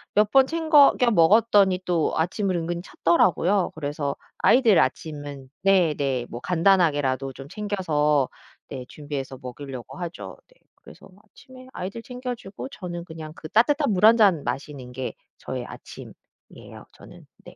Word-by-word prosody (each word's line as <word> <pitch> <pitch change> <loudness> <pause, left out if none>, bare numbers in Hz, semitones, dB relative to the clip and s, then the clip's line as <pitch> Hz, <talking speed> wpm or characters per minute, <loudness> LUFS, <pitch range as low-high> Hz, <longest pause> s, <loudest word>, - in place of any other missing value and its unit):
몇 210 0 +3
번 270 -1 +5
챙거 315 -3 +5
겨 245 -2 +3
먹었더니 195 0 +4
또 170 -3 0
아침을 185 +3 -1
은근 170 0 -3
찾더라고요. 175 +2 +1
그래서 145 -2 -3 0.2
아이들 235 -6 +5
아침은 145 -4 -3
네네 150 -10 +2
뭐 120 - -7
간단하게라도 145 -6 +1
좀 135 +1 -11
챙겨서 155 -10 0 0.4
네 130 -2 -7
준비해서 140 -3 -6
먹이려고 130 0 -8
하죠. 175 -2 -7
네 - - -28 0.2
그래서 - - -15 0.2
아침에 255 +4 -16
아이들 195 +6 -6
챙겨 250 -1 -5
주고 205 +3 -9
저는 175 -8 -7
그냥 160 -2 -9
그 155 - -10
따뜻한 285 +4 +2
물 195 +1 +3
1 225 +1 +7
잔 190 -10 +4
마시는 135 -3 -5
게 130 +1 -5 0.3
저의 - - -5
아침이에요 - - -13
저는. - - -15 0.2
네. - - -13
175 Hz, 310 characters per minute, -24 LUFS, 145-210 Hz, 0.4 s, 1